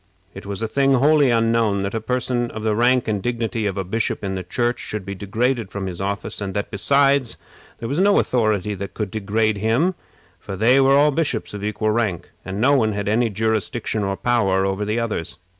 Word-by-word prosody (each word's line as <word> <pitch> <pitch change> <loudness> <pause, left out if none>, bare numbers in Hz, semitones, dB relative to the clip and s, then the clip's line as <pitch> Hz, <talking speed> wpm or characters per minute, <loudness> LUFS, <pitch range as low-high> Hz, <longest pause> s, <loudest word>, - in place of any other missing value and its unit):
It - - -10
was 100 +2 -4
a - - 0
thing 135 +3 +2
wholly 145 +1 +4
unknown 115 -3 +2
that 100 - -3
a 115 - -2
person 125 0 -1
of 110 - -7
the 110 -1 +1
rank 125 +2 +3
and 105 -2 -1
dignity 115 -1 -2
of 95 - -3
a 95 - -1
bishop 110 +4 -2
in 95 -1 -2
the 95 - -3
Church 120 +7 -1
should 105 -3 -5
be 100 - -4
degraded 110 +3 -1
from 100 -2 -5
his 90 -1 -5
office; 100 +1 -3
and 95 -1 -4
that, 105 - -3
besides, 140 +3 +2 0.4
there 115 - -5
was 140 +7 -1
no 200 +1 +4
authority 105 -4 +1
that 100 -1 -7
could 105 -4 -3
degrade 110 0 0
him, 120 - +2 0.5
for 100 - -7
they 125 +6 +4
were 135 +1 +5
all 150 +1 +5
bishops 140 -9 -2
of 100 -1 -6
equal 105 +1 -1
rank, 105 -6 -1
and 95 +1 -5
no 135 +5 +4
one 110 -5 +2
had 100 0 -3
any 115 +3 +2
jurisdiction 110 +1 -1
or 100 0 -2
power 100 -6 +1
over 95 +2 -1
the 110 +3 -1
others. 110 -8 -3
110 Hz, 215 wpm, -21 LUFS, 100-120 Hz, 0.5 s, were